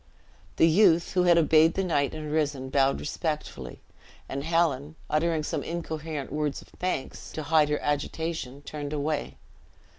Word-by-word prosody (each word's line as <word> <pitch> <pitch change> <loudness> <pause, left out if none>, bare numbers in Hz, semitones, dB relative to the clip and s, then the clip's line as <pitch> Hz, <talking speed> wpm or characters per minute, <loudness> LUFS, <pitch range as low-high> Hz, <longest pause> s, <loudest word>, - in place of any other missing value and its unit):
The 165 - +5
youth, 170 -1 +4
who 180 -1 +2
had 175 -1 +6
obeyed 160 0 +5
the 195 - +1
knight 145 -6 0
and 155 -1 -5
risen, 145 -4 -1
bowed 135 0 +3
respectfully; 150 - -4 0.5
and 140 +1 -4
Helen, 160 -3 +1 0.2
uttering 160 0 +1
some - - -2
incoherent 160 -4 -5
words 150 -1 -1
of - - -15
thanks, 180 -7 -4
to 155 - -4
hide 155 -1 +3
her 150 - 0
agitation 145 -1 -3
turned 145 0 -5
away. 150 0 -2
155 Hz, 150 wpm, -27 LUFS, 145-165 Hz, 0.5 s, had